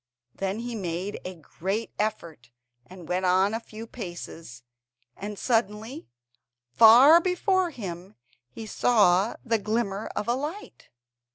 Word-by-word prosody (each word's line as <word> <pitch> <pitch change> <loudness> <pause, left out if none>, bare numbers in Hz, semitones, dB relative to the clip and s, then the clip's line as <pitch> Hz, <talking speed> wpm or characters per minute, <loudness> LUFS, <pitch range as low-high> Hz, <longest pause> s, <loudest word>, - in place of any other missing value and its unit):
Then 195 +3 -3
he 240 0 -5
made 185 -1 -4
a 185 0 -7
great 195 +7 -4
effort 170 - -4 0.4
and 180 -3 -12
went 180 +2 -1
on 185 +3 +3
a 225 - -1
few 225 -1 -10
paces, 175 - -9 0.5
and 205 +1 -7
suddenly, 225 +4 -2 0.6
far 250 - +8
before 370 +1 +1
him, 190 - -8 0.3
he 220 - -9
saw 210 -3 +3
the 230 -2 +1
glimmer 215 -1 -2
of 210 - -3
a 240 - +2
light. 300 +10 -6
210 Hz, 125 wpm, -26 LUFS, 185-235 Hz, 0.6 s, far